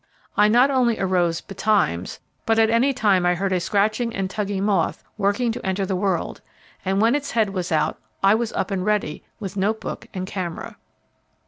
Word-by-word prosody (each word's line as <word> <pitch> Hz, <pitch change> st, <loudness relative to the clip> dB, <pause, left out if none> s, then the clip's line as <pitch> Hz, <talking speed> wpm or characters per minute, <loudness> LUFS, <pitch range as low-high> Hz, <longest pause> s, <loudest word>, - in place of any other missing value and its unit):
I 210 Hz, -, +5 dB
not 245 Hz, +6 st, +5 dB
only 245 Hz, -4 st, +2 dB
arose 175 Hz, -3 st, +1 dB
'betimes,' 195 Hz, -, 0 dB, 0.3 s
but 225 Hz, 0 st, +3 dB
at 225 Hz, 0 st, +4 dB
any 240 Hz, +5 st, +3 dB
time 205 Hz, -7 st, +2 dB
I 175 Hz, 0 st, +3 dB
heard 190 Hz, +2 st, -1 dB
a 180 Hz, -, +2 dB
scratching 215 Hz, +5 st, 0 dB
and 190 Hz, -1 st, -2 dB
tugging 200 Hz, -2 st, -2 dB
moth 195 Hz, -6 st, 0 dB
working 215 Hz, +4 st, +1 dB
to 225 Hz, -, -6 dB
enter 190 Hz, +1 st, -1 dB
the 190 Hz, -, -2 dB
world, 185 Hz, -3 st, -1 dB, 0.4 s
and 195 Hz, +1 st, 0 dB
when 225 Hz, +3 st, +4 dB
its 290 Hz, -1 st, -1 dB
head 220 Hz, -4 st, +1 dB
was 185 Hz, -2 st, -3 dB
out, 155 Hz, -, +1 dB, 0.2 s
I 195 Hz, +1 st, +6 dB
was 225 Hz, 0 st, 0 dB
up -, -, -2 dB
and 190 Hz, -2 st, -1 dB
ready 210 Hz, -7 st, -1 dB, 0.2 s
with 195 Hz, -3 st, -6 dB
note 210 Hz, +3 st, +1 dB
book -, -, -6 dB
and 185 Hz, -2 st, -4 dB
camera. 185 Hz, -3 st, -5 dB
200 Hz, 195 wpm, -23 LUFS, 185-220 Hz, 0.4 s, I